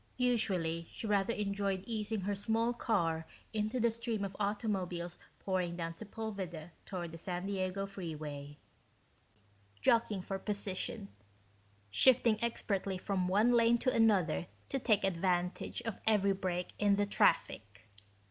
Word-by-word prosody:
Usually 185 -10 +1
she - - -5
rather 205 0 +2
enjoyed 200 -2 -1
easing 220 -2 -2
her 205 +2 -1
small 225 +4 +1
car 165 -9 0 0.3
into 215 +3 0
the 235 0 +3
stream 230 -2 -2
of 195 0 -6
automobiles 195 -4 -2 0.2
pouring 185 -3 -1
down 165 -1 -3
Sepulveda 190 -4 -6 0.2
toward 175 -4 -4
the 165 - -8
San 180 +1 -3
Diego 195 0 -1
Freeway, 150 -7 -6 1.2
jockeying 210 - +2
for 195 0 -3
position, 200 - -3 0.8
shifting 235 - +4
expertly 200 -4 -1
from 185 -1 -1
one 210 +6 +4
lane 235 0 +5
to 255 +2 +1
another 195 -7 +3 0.2
to 270 - -1
take 215 -5 +2
advantage 180 -1 0
of 225 -4 -4
every 200 -2 +4
break 180 -2 -2
in 205 -1 +4
the 205 0 +2
traffic. 105 - +1
195 Hz, 130 wpm, -34 LUFS, 175-220 Hz, 1.2 s, lane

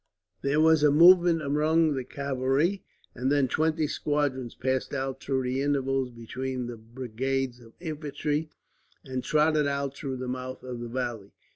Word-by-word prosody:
There 140 +2 +1
was 160 -1 +5
a 150 - +6
movement 170 +1 +6
among 155 +2 +2
the 130 -2 -2
cavalry, 140 +8 0 0.3
and 130 +3 -1
then 145 -2 +3
twenty 160 +3 +1
squadrons 145 -5 -1
passed 130 +1 -1
out 135 0 -3
through 135 -1 -1
the 130 +2 -1
intervals 135 -2 0
between 125 +2 -5
the 120 0 -6
brigades 125 +2 -3
of 115 -1 -16
infantry, 150 -1 -3 0.6
and 130 -2 -4
trotted 150 +1 +3
out 140 -1 -2
through 135 -3 -4
the 130 0 -5
mouth 130 +1 -5
of 125 -2 -6
the 120 0 -6
valley. 120 -5 -4
135 Hz, 155 wpm, -27 LUFS, 130-150 Hz, 0.6 s, a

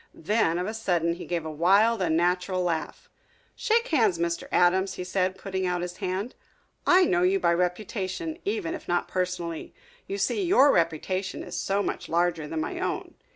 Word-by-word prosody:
Then 175 -2 +1
of 180 - -1
a 215 - -3
sudden 175 -7 0
he 175 - -8
gave 170 -2 -2
a 155 - -4
wild, 200 +8 +3
unnatural 180 +2 +1
laugh. 165 -3 -3 0.5
"Shake 470 +1 +1
hands, 225 - +3
Mr. 170 0 -2
Adams," 190 +2 +3
he 180 - -5
said, 185 +1 -1
putting 190 -1 -3
out 180 -1 -1
his 180 0 -6
hand. 195 +4 -3 0.5
"I 365 +1 +6
know 355 0 +2
you 375 +2 +3
by 170 - +3
reputation 190 - -2
even 400 -5 -2
if - - -8
not 175 0 0
personally. 180 -3 -3 0.3
You 395 - -3
see, 410 - 0
your 340 -6 +5
reputation 185 - -1
is - - -7
so 200 +1 0
much - - -4
larger 170 -2 +1
than 160 +1 -3
my - - -4
own." - - -3
185 Hz, 180 wpm, -26 LUFS, 175-225 Hz, 0.5 s, I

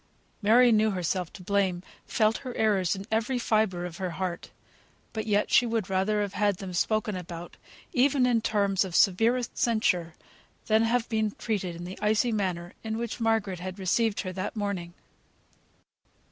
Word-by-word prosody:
Mary 235 +4 +6
knew 220 0 +4
herself 180 -2 -2
to 185 - -11
blame; 190 -2 0 0.2
felt 220 -1 +2
her 255 -3 -7
errors 200 -4 +2
in 195 0 -7
every 230 +4 0
fibre 215 -6 +1
of 170 -2 -7
her 185 -2 -3
heart; 185 -2 -4 0.6
but 220 -1 -4
yet 205 -1 +1
she - - +6
would 225 -5 -2
rather 205 +3 +1
have 200 -1 -5
had 205 0 +1
them 190 -1 -7
spoken 215 +4 0
about, 175 -1 -7 0.4
even 260 0 +3
in 240 -2 +2
terms 200 -3 +1
of 185 -3 -6
severest 225 +6 +3
censure, 180 -8 +1 0.5
than 220 0 +3
have 230 +1 +1
been 220 -1 0
treated 195 -6 -2
in 170 - -8
the 180 +2 -8
icy 220 +3 +2
manner 185 -4 -2
in 220 0 -3
which 235 0 -4
Margaret 220 -5 0
had 185 +1 -6
received 205 +3 +1
her 185 -2 -5
that 185 +4 -4
morning. 195 -5 -3
205 Hz, 170 wpm, -27 LUFS, 185-225 Hz, 0.6 s, Mary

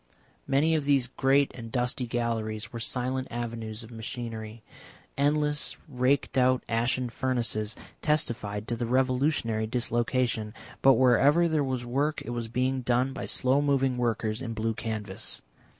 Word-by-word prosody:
Many 150 +4 +3
of 155 -3 +1
these 140 -3 +4
great 135 +2 +2
and 115 -2 -8
dusty 125 0 -1
galleries 110 -2 -2
were 115 - -4
silent 130 +3 0
avenues 115 -2 -5
of 115 - -12
machinery, 115 -1 -6 0.5
endless 150 +1 +1
raked 130 0 +1
out 130 0 +3
ashen 120 +3 0
furnaces 120 -3 -1 0.3
testified 115 -9 -1
to 120 - 0
the 115 0 -3
revolutionary 130 -3 +1
dislocation, 120 -2 -1 0.3
but 135 - +7
wherever 135 +7 +5
there 155 -3 +1
was 130 -2 -2
work 145 +5 0
it 120 - -4
was 120 -1 -3
being 130 +3 0
done 125 +2 +1
by - - -5
slow 130 +2 +2
moving 135 -3 +2
workers 115 -2 -1
in 115 -3 -4
blue 110 +1 -1
canvas. 105 -2 -5
125 Hz, 145 wpm, -28 LUFS, 115-135 Hz, 0.5 s, but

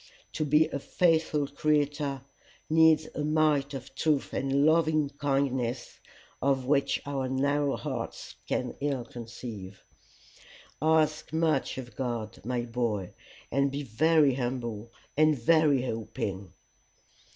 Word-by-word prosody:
To - - -1
be 150 +2 +4
a 140 - -3
faithful 160 -2 +1
creator 145 -1 0 0.5
needs 160 -1 +5
a 150 - -3
might 150 -2 +2
of 130 0 -8
truth 150 -3 0
and 135 +1 +1
loving 155 -2 +3
kindness 135 -4 -1 0.4
of 135 -2 +1
which 140 0 +2
our 135 -2 -2
narrow 140 +2 +1
hearts - - -5
can 125 -1 -1
ill 140 -4 -1
conceive. 115 -5 -9 1.0
Ask 155 -1 +2
much 160 -5 +1
of 120 -4 -8
God, 120 -5 -4
my 125 +2 -1
boy, 115 -5 -2 0.4
and 140 +2 +2
be 140 +1 -3
very 145 +4 +3
humble 120 -3 -4 0.2
and 155 0 +4
very 145 0 +3
hoping." 105 -5 -4
140 Hz, 120 wpm, -28 LUFS, 125-150 Hz, 1.0 s, needs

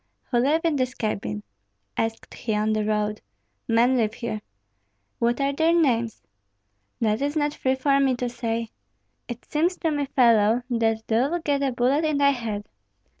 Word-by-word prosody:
"Who 240 - +3
live 295 +6 +2
in 325 -3 +1
this 255 -1 -1
cabin?" 105 - -3 0.5
asked 225 0 -3
he 220 -3 -3
on 215 +1 +1
the 215 0 0
road. 210 0 -1 0.5
"Men 240 +3 +3
live 220 -2 0
here." 225 -4 -4 0.8
"What 235 +2 +1
are 275 0 +1
their 320 +3 +2
names?" 235 -9 +1 0.8
"That 215 +1 +1
is 290 +2 -1
not 295 -1 +1
free 260 -2 0
for 275 +1 +2
me 270 -2 +3
to 245 0 -2
say." 230 -2 -3 0.6
"It 240 -1 -7
seems 340 +5 0
to 325 - 0
me, 290 -2 -1
fellow, 230 -3 +4
that 225 -1 +1
thou'lt 275 +10 0
get 285 -2 +1
a 275 -1 +1
bullet 255 +5 +1
in 310 -2 +1
thy 280 0 +5
head." 220 -6 -4
245 Hz, 175 wpm, -24 LUFS, 225-280 Hz, 0.8 s, thy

